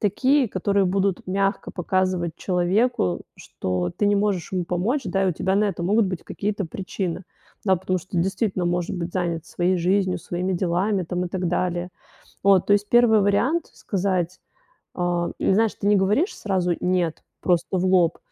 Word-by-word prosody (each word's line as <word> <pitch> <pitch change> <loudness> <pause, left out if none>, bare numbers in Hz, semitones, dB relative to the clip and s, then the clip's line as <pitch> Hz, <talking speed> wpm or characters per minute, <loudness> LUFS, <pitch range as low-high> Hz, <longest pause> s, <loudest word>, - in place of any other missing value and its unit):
такие, 255 +5 +2
которые 195 0 +1
будут 195 0 0
мягко 195 +2 -1
показывать 185 -2 -1
человеку, 180 - +1 0.2
что 90 -1 -3
ты 205 - +1
не 205 0 +3
можешь 200 -4 0
ему 180 -2 -1
помочь, 195 - -1
да, 195 +1 0
и - - +2
у - - +1
тебя 190 +4 -1
на 210 - +3
это 180 -4 -2
могут 205 +3 +3
быть 185 -3 -5
какие-то 205 -1 -3
причины. 185 0 -4 0.4
Да, 190 -1 +4
потому 185 +1 -1
что, 175 +1 -5
действительно, 190 0 0
может 175 +1 -1
быть 175 0 -4
занят 170 -3 -2
своей 180 +1 0
жизнью, 185 +1 +1
своими 180 +3 -3
делами 185 +3 0
там 180 +1 -2
и - - -7
так 180 -1 -2
далее. 175 0 -1 0.6
Вот. 195 -2 +4
То 205 - +5
есть, 205 0 +1
1 235 -3 +5
вариант 250 +12 +1
сказать, 185 -2 -2 0.6
э 175 -1 0
или - - +2
знаешь, 220 0 +2
ты 200 - -5
не 205 - +5
говоришь 210 - +1
сразу 185 -4 0
"нет", 180 -3 0 0.2
просто 175 -2 +2
в 180 - 0
лоб, 180 -3 +3
185 Hz, 175 wpm, -23 LUFS, 175-200 Hz, 0.6 s, То